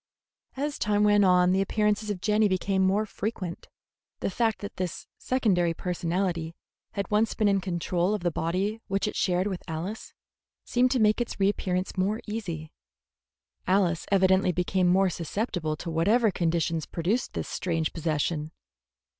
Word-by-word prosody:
As 290 +2 -2
time 210 -1 +2
went 205 -1 +5
on, 180 -1 +5
the 190 +1 +3
appearances 210 +1 0
of 195 -4 -3
Jenny 215 0 +3
became 190 0 0
more 195 +3 +2
frequent. 195 -4 -5 0.5
The - - -1
fact 225 +2 0
that 205 - -7
this 185 -2 -4
secondary 185 -10 +1
personality 175 -1 -2 0.4
had 200 0 -3
once 215 +1 +2
been 215 - +2
in 195 -1 +2
control 180 +1 0
of 210 - -5
the 175 - +1
body 190 +8 -1
which 195 +1 0
it - - -4
shared 180 0 +1
with 190 -3 -3
Alice 175 +7 -5 0.5
seemed 250 +1 +2
to 255 0 +1
make 215 +1 +3
its 240 - -4
reappearance 190 -1 0
more 205 +4 +1
easy. 175 -8 -5 1.0
Alice 185 -3 +2
evidently 190 -1 +4
became 180 +1 +1
more 185 +1 +4
susceptible 170 -2 -2
to 165 +2 -6
whatever 210 +8 +3
conditions 165 -2 0
produced 195 +9 -1
this - - -3
strange 165 -3 -2
possession. 155 -1 -1
190 Hz, 155 wpm, -27 LUFS, 175-210 Hz, 1.0 s, went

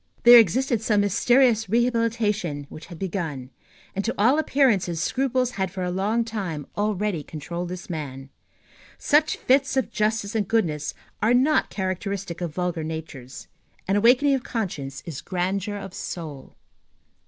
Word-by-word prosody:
There 240 0 +10
existed 235 +3 +2
some 210 -2 +2
mysterious 225 +2 +3
re 235 +3 +3
habilitation 215 - -1
which 155 - -10
had 170 - -10
begun; 160 -8 -4 0.4
and, 195 - -1
to 230 - -2
all 250 +9 +4
appearances, 220 - +2
scruples 255 - 0
had 190 -5 -2
for 185 0 -5
a 180 - -1
long 210 +5 0
time 185 -10 -4
already 205 -4 -1
controlled 170 +4 -6
this 180 -1 -7
man. 140 -5 -6 0.7
Such 300 +1 +2
fits 265 0 +2
of 265 - 0
justice 215 -1 -1
and 215 -4 0
goodness 160 -10 0 0.3
are 230 +3 +4
not 280 +5 +3
characteristic 190 -1 -4
of 170 -2 -2
vulgar 175 0 -2
natures. 155 -5 -7 0.4
An 195 - +2
awakening 250 +7 +4
of 265 - 0
conscience 150 - -4
is 155 -5 -6
grandeur 190 +3 -2
of 195 -2 -8
soul. 155 -6 -7
200 Hz, 150 wpm, -24 LUFS, 170-230 Hz, 0.7 s, There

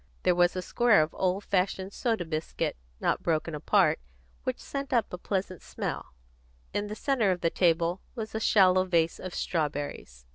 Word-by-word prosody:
There 180 - +4
was 175 0 +3
a 185 - -2
square 230 -3 +4
of 155 - -6
old 190 +2 0
fashioned 190 0 -1
soda 225 -8 -1
biscuit, 155 0 -2 0.2
not - - 0
broken 160 0 0
apart, 150 - +3 0.5
which - - -1
sent 275 -1 -5
up 235 -7 +1
a - - -3
pleasant 185 -2 -3
smell; - - -5 0.6
in 205 0 -1
the 210 - -5
centre 240 -4 +1
of 180 -1 0
the 165 - +1
table 170 +1 +2
was 220 -3 -5
a 220 - -1
shallow 185 -4 +5
vase 170 -3 +1
of 185 -1 -6
strawberries. 145 - -3
185 Hz, 175 wpm, -28 LUFS, 165-205 Hz, 0.6 s, shallow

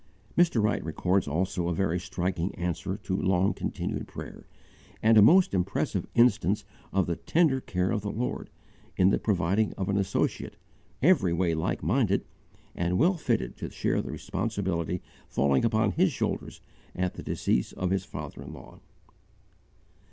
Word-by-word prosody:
Mr. 170 -11 +3
Wright 105 - +1
records 90 +4 0
also 90 +3 -1
a 85 - 0
very 90 -2 0
striking 90 0 -2
answer 90 +2 -3
to 95 - -3
long 95 0 +2
continued - - -4
prayer, - - -9 0.6
and 110 +1 +6
a 105 - +8
most 175 - +6
impressive 90 -2 -1
instance 105 -4 +3 0.3
of 95 -2 +2
the 85 - -1
tender 135 - +2
care 90 -4 -1
of 105 - 0
the 105 - -3
Lord, 125 +3 -3 0.5
in 95 +1 +5
the - - +2
providing 100 +1 +1
of 95 -1 -3
an 100 - +1
associate, 100 -2 -1 0.5
every 135 - +4
way 85 -1 +1
like 80 0 -2
minded, 100 - +1 0.5
and 90 +1 0
well 170 +7 +4
fitted 160 - -1
to - - -5
share - - 0
the - - -7
responsibility 95 -6 -2 0.3
falling 70 -1 +2
upon 110 -2 +2
his 180 - +2
shoulders - - -3 0.3
at 90 0 -1
the - - -8
decease - - 0
of 90 0 -2
his 95 -1 +1
father - - -8
in - - -8
law. - - -13
95 Hz, 160 wpm, -28 LUFS, 90-110 Hz, 0.6 s, a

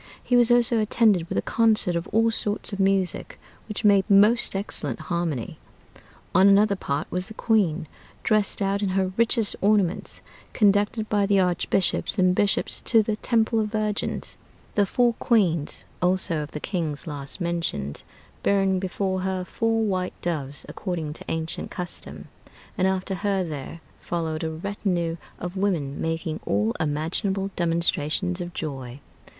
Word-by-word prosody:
He 245 - +1
was 240 -1 +5
also 240 -1 +4
attended 210 -5 +2
with - - -2
a - - +1
concert 220 -6 +2
of 170 +2 -2
all 225 +1 +2
sorts 210 -1 -2
of 200 - -4
music, 195 -3 0 0.3
which 210 0 -5
made 200 -2 +4
most 210 +3 +4
excellent 150 - -3
harmony. 160 -6 -3 0.7
On 190 +1 +6
another 200 +1 +5
part 145 -5 -2
was 180 +1 -2
the 220 - -11
queen, 185 -10 +1 0.4
dressed 215 -1 +1
out 195 +1 0
in 200 - 0
her 190 -1 +1
richest 230 -1 +1
ornaments, 200 -3 +1 0.3
conducted 205 +1 +2
by 205 -2 +1
the 200 -1 +3
archbishops 180 +3 +2
and 185 -1 +4
bishops 200 +1 0
to 225 -2 +5
the 215 0 -1
Temple 225 +1 +1
of 215 - 0
Virgins; 215 -1 -2 0.4
the 205 -2 +2
four 240 +3 +2
queens 175 - +1 0.2
also 180 -3 +1
of 150 - -6
the 150 - -6
kings 165 -5 -3
last 145 -2 -6
mentioned, 170 - -3 0.4
bearing 195 -1 +2
before 190 0 -2
her 185 -1 -2
four 225 +3 0
white 185 -3 -2
doves, 145 -5 -2
according 165 -6 -4
to - - -8
ancient 160 0 -3
custom; 180 -2 -5 0.5
and 190 -2 +2
after 190 0 -1
her 195 0 0
there 160 0 -6 0.2
followed 160 -2 -3
a 160 - -1
retinue 175 -1 -2 0.2
of 180 +1 -6
women, 175 -8 -1
making 165 0 -2
all 105 +3 +1
imaginable 180 +6 -1
demonstrations 170 +1 0
of 175 0 -5
joy. 135 -4 -5
190 Hz, 150 wpm, -25 LUFS, 165-205 Hz, 0.7 s, On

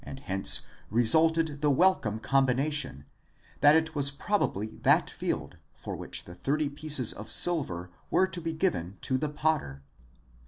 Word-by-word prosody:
667 135 -5 -7
hence - - +2 0.2
resulted 155 +6 +5
the 150 - +2
welcome 140 - +1
combination, 135 - 0 0.5
that 145 +1 +5
it 160 0 0
was 140 -2 0
probably 140 - -3
that - - +2
field - - -5 0.2
for - - -8
which - - -4
the 85 - -11
thirty 140 +11 -2
pieces 145 -4 +1
of 105 - -10
silver 90 - +1 0.2
were 190 - +2
to 180 -2 -6
be 165 0 -3
given 100 - -2
to 130 -1 -1
the 150 +1 -3
otter. 105 - -1
140 Hz, 150 wpm, -27 LUFS, 110-160 Hz, 0.5 s, resulted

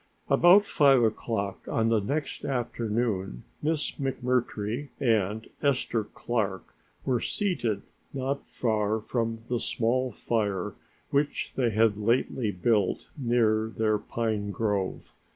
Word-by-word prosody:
About 185 +4 +7
five 135 -8 +5
o'clock 110 -3 -1
on 115 0 +1
the 115 -1 +3
next 140 +8 -3
afternoon 115 - -1 0.2
Miss 155 0 0
McMurtry 125 -1 -1
and 110 -4 +1
Esther 130 -6 +1
Clark 105 -6 -3 0.3
were 125 -3 +1
seated 120 - -1 0.3
not 140 +1 -3
far 110 -2 0
from 115 0 -2
a 120 - +1
small 125 +3 0
fire 105 -4 -1 0.4
which 145 +1 0
they 125 -3 +1
had 110 -1 +3
lately 115 +1 +1
built 100 +1 0
near 115 -5 +2
their 110 -1 +2
pine 110 -2 -2
grove. 100 -2 -2
115 Hz, 115 wpm, -28 LUFS, 105-130 Hz, 0.4 s, About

